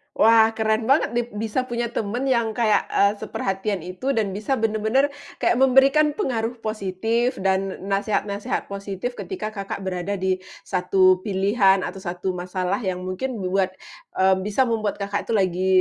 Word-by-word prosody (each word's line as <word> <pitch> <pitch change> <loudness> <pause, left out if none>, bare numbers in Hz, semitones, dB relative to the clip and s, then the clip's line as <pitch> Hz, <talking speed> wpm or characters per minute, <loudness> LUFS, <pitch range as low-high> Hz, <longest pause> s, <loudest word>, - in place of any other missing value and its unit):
Wah, 225 0 +5
keren 220 0 0
banget 275 -1 +3
nih. 240 0 0 0.2
Bisa 255 +4 -1
punya 235 -1 -2
teman 230 +4 -2
yang 235 -5 +1
kayak, 225 -3 +2
eee, 200 0 +3
seperhatian 195 -1 -3
itu 185 +10 -3
dan 210 -4 0
bisa 210 +7 -1
bener-bener 225 +4 +1 0.3
kayak 240 - +3
memberikan 270 +3 +5
pengaruh 240 - -1
positif 220 +4 -1
dan 190 0 0 0.2
n 195 - -6
nasehat-nasehat 200 0 -1
positif 200 +3 -4
ketika 245 - -5
Kakak 195 -1 -5
berada 190 +1 -2
di 185 -1 0 0.2
satu 185 0 +3
pilihan 195 0 +2
atau 195 - -5
satu 180 0 -3
masalah 180 +2 -2
yang 185 -4 -3
mungkin 190 +8 -3
buat 185 0 0 0.4
eee, 190 0 +4
bisa 210 +7 +1
membuat 225 -4 -1
Kakak 200 0 -3
itu - - -1
lagi 185 -2 +1
205 Hz, 155 wpm, -23 LUFS, 190-235 Hz, 0.4 s, Wah